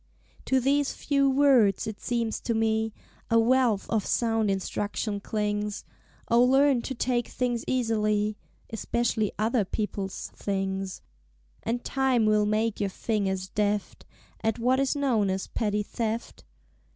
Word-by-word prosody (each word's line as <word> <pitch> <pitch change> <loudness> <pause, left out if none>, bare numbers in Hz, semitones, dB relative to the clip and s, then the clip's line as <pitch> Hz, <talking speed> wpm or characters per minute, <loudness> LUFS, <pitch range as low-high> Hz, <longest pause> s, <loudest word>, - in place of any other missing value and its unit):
_" - - -26
To 265 - +3
these 275 +2 +1
few 275 -2 +1
words, 260 -8 +4
it 215 -1 -6
seems 230 -2 -1
to 230 - -1
me, 220 0 +1 0.4
A 230 - +4
wealth 235 -3 +3
of 220 -3 0
sound 225 -1 +1
instruction 205 +2 -2
clings; 210 0 -2 0.4
O 235 +1 +4
Learn 270 0 +4
to 265 - -5
Take 240 0 0
things 245 -2 -2
easily 215 -4 +1 0.4
Espeshly 225 -1 0
Other 220 +1 +1
People's 195 -1 -4
Things; 195 -1 -3 0.6
And 240 +2 -2
Time 265 -4 +1
will 210 -1 +3
make 215 +1 0
your 200 - +1
fingers 190 -2 -2
deft 210 -1 -2 0.4
At 225 -1 +1
what 250 +3 +2
is 275 +1 +1
known 245 -8 +1
as 190 0 -1
Petty 210 -2 -1
Theft. 225 +2 -4
220 Hz, 140 wpm, -27 LUFS, 210-245 Hz, 0.6 s, words